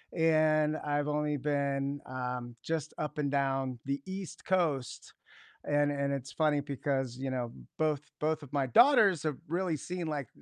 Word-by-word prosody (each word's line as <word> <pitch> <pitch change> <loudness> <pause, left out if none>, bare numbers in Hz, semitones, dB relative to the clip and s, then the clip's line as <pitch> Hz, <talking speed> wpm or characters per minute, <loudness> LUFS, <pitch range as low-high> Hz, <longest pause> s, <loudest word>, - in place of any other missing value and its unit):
and 155 -1 +3
I've 145 0 -1
only 150 0 0
been, 140 0 0
um, 125 -1 -4
just 160 -2 -2
up 150 +1 -4
and 145 -1 +1
down 135 -2 0
the 140 0 -1
East 190 -2 -6
Coast, 160 -9 0 0.5
and 145 0 +3
and 140 -1 0
it's 135 0 -4
funny 150 -2 +2
because, 135 -3 -2
you 135 0 -3
know, 125 -2 -2 0.3
both 155 -3 +2 0.2
both 155 0 0
of 140 0 -12
my 140 -2 +1
daughters 205 - +6
have 155 -3 0
really 175 0 0
seen, 180 +3 -4
like, 145 -6 -2
145 Hz, 160 wpm, -31 LUFS, 135-155 Hz, 0.5 s, daughters